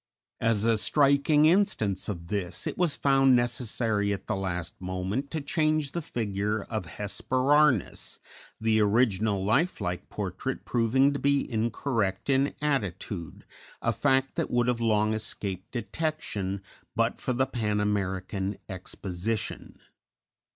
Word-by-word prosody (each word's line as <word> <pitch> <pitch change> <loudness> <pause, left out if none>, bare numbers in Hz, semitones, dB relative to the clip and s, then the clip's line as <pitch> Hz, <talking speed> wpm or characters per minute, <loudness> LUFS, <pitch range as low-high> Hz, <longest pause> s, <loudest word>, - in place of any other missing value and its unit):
As 115 -2 +2
a 115 -1 +4
striking 145 +5 +4
instance 155 - +2
of 85 -4 -5
this, 95 -4 -3
it - - -2
was 175 -5 +1
found 135 -2 +5
necessary 115 -4 0
at 100 - -3
the 110 - -1
last 90 -3 -3
moment 95 +9 -2
to 160 0 -3
change 155 0 +1
the 170 - -3
figure 105 -5 -2
of 110 -6 -4
Hesperornis, 130 - +2 0.4
the 110 0 +2
original 105 -2 +2
life 145 - +2
like 90 -3 -3
portrait - - -4
proving 130 +4 +3
to 140 - -3
be 140 0 +2
incorrect 110 -1 0
in 135 +1 +2
attitude, 100 - -2 0.3
a - - 0
fact 135 -1 +2
that - - 0
would 120 -1 +2
have 120 -1 0
long 110 -1 +2
escaped 100 -3 -4
detection 115 - -3 0.3
but - - +1
for 130 - -1
the 130 +2 +2
Pan 105 -5 -1
American 100 -1 -1
Exposition. 95 +2 -4
110 Hz, 130 wpm, -28 LUFS, 100-135 Hz, 0.4 s, found